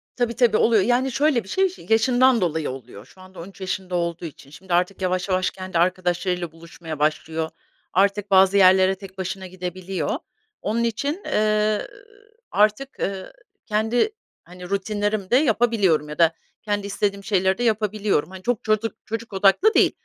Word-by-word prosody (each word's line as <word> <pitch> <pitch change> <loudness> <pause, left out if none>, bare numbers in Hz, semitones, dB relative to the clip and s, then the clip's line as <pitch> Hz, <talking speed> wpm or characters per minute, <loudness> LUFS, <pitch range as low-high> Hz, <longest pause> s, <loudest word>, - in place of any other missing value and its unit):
Tabii 240 -2 -1
tabii, 235 -4 +3
oluyor. 225 -3 +4
Yani, 250 +4 +1
şöyle 275 -3 +2
bir 195 - -15
şey 385 0 +2
şi 365 - -13
yaşından 245 +2 +4
dolayı 160 -3 -1
oluyor, 125 -5 -9
şu 185 - -19
anda 185 0 -14
13 190 +3 -11
yaşında 185 -1 -3
olduğu 170 0 -2
için. 145 -3 -11
Şimdi 180 +4 -7
artık 180 +3 +1
yavaş 185 +1 -1
yavaş 185 0 +1
kendi 185 -2 -5
arkadaşlarıyla 180 0 0
buluşmaya 165 -1 -9
başlıyor, 160 +1 -1 0.4
artık 200 +2 +1
bazı 190 +1 +5
yerlere 190 0 +5
tek 195 -1 -13
başına 190 0 -5
gidebiliyor. 180 -2 -5 0.5
Onun 230 +3 -1
için, 280 - -2
eee, 215 0 +1 0.6
artık, 215 +6 +1
ııı, 195 - -4 0.3
kendi, 220 - +1 0.3
hani, 180 +1 -11
rutinlerimi 205 0 -2
de - - +5
yapabiliyorum 225 - +2
ya 150 - -7
da 165 -1 +4 0.3
kendi 205 -1 -2
istediğim 200 0 -2
şeyleri 190 -2 +1
de 245 - -2
yapabiliyorum. 215 -6 0
Hani, 190 0 -11
çok 245 -3 -1
çocuk 215 +1 0
çocuk 225 0 -6
odaklı 200 - +4
değil. - - +4
195 Hz, 160 wpm, -23 LUFS, 180-220 Hz, 0.6 s, bazı